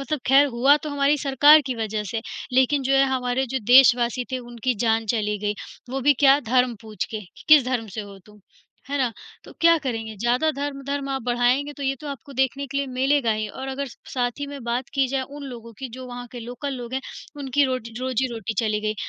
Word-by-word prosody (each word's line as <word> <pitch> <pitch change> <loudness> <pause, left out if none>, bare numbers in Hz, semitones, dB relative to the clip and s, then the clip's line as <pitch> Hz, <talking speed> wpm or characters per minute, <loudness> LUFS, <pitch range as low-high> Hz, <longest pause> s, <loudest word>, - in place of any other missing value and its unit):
मतलब 275 +2 -3
खैर 275 +2 +6
हुआ 270 +3 +4
तो 305 - -4
हमारी 285 +1 +2
सरकार 290 +3 +6
की 255 - -2
वजह 215 -2 -3
से, 225 -1 -3 0.3
लेकिन 260 +2 +3
जो 270 +1 +1
है 275 - +5
हमारे 250 +1 -1
जो 265 +2 -2
देशवासी 250 -1 +6
थे 260 - 0
उनकी 240 0 -3
जान 225 0 +1
चली 210 -1 -1
गई, 205 +1 -2 0.4
वो 270 - -2
भी 285 +2 +4
क्या 275 +1 +7
धर्म 250 -1 +3
पूछ 215 -1 -4
के 215 - -3 0.3
किस 300 -4 +8
धर्म 245 -3 -1
से - - -2
हो 200 -1 -10
तुम? 210 -1 -18 0.5
है 285 - -2
ना? 250 -4 +1 0.3
तो - - -12
क्या 335 0 +6
करेंगे? 225 -3 -3
ज़्यादा 245 +8 +1
धर्म-धर्म 280 0 -4
आप 270 -1 -2
बढ़ाएँगे, 245 +4 +1
तो 285 - -9
ये 270 0 0
तो 300 - -8
आपको 280 0 -8
देखने 265 +1 0
के 275 0 -6
लिए 280 0 0
मिलेगा 260 -1 +1
ही 215 0 -2
और 265 +5 -7
अगर 275 +1 -3
स - - -14 0.2
साथ 245 -1 +1
ही 285 - -2
में 280 -2 -8
बात 240 +2 -2
की 275 -2 +3
जाए 270 0 -1
उन 290 - -8
लोगों 235 -3 -9
की 265 - -5
जो 255 +2 -8
वहाँ 245 0 -7
के 245 - -7
लोकल 245 +4 -5
लोग 245 -1 -7
हैं, 265 - -1 0.4
उनकी 280 0 +1
रोट 255 -3 -2
रोज़ी-रोटी 250 -3 -2
चली 215 -2 +1
गई, 215 0 -1
255 Hz, 225 wpm, -23 LUFS, 235-275 Hz, 0.5 s, किस